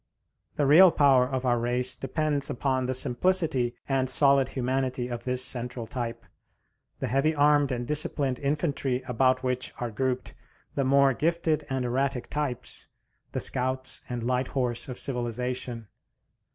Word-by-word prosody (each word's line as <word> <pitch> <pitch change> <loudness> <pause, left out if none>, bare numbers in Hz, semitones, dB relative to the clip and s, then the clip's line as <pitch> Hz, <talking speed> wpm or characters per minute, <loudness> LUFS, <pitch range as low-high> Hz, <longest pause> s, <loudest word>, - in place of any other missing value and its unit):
The 145 - +1
real 165 +7 +8
power 135 -5 +4
of 130 -1 -3
our 120 -1 +2
race 125 +2 0
depends 145 +1 -1
upon 130 -1 -1
the 130 - -1
simplicity 130 -2 +2
and 135 -2 +1
solid 140 -2 +4
humanity 130 -1 -2
of 120 -1 -6
this 125 0 +1
central 125 -2 -2
type, 120 -1 -5 0.7
the - - -3
heavy 135 +6 +1
armed 145 -1 +3
and 120 -1 -2
disciplined 145 -3 -1
infantry 140 -3 -1
about 130 +1 +2
which 125 0 -2
are 120 -2 -3
grouped 130 +2 -2 0.4
the 140 - 0
more 135 0 +4
gifted 160 +2 0
and 130 -1 -1
erratic 130 0 -1
types, 140 -4 -4 0.5
the - - -1
scouts 130 +1 -1
and 120 -2 -4
light 125 +1 0
horse 125 -2 -2
of 125 - -6
civilization. 125 -2 -3
130 Hz, 145 wpm, -27 LUFS, 125-140 Hz, 0.7 s, real